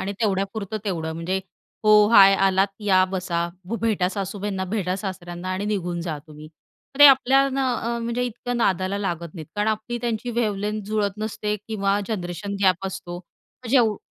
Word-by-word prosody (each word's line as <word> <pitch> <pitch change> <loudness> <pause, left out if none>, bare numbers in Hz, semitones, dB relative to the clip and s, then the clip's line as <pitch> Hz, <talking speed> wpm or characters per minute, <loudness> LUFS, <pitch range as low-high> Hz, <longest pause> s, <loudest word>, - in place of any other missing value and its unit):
आणि 200 - -3
तेवढ्यापुरतं 200 0 -1
तेवढं 160 -5 -2
म्हणजे 175 +4 -2 0.4
हो, 210 -1 +7
हाय, 195 -3 +8
आलात 195 0 +3
या, 190 -3 +4
बसा, 180 -2 -2 0.2
भ 220 +6 -4
भेटा 210 -6 +1
सासूबाईंना, 195 0 -3
भेटा 185 -2 -2
सासऱ्यांना 185 -2 -6
आणि 190 +2 -3
निघून 180 -4 -2
जा 165 -3 -4
तुम्ही. 155 0 -12 0.5
ते 290 - +10
आपल्या 270 0 +5
ना, 270 -1 0
अ, 235 +1 -2
म्हणजे 235 +1 -2
इतक्या 245 +1 -5
नादाला 195 -4 0
लागत 170 -5 -4
नाहीत, 160 -4 -8
कारण 210 +1 +1
आपली 220 +2 -2
त्यांची 240 0 -2
वेव्हलेन्थ 210 -2 -2
जुळत 210 -1 -1
नसते 210 -1 -2
किंवा 200 -2 0
जनरेशन 185 -1 -4
गॅप 185 0 +2
असतो 190 -2 -6
मग 230 +7 -15
जेव 235 -5 +4
200 Hz, 165 wpm, -23 LUFS, 185-220 Hz, 0.5 s, ते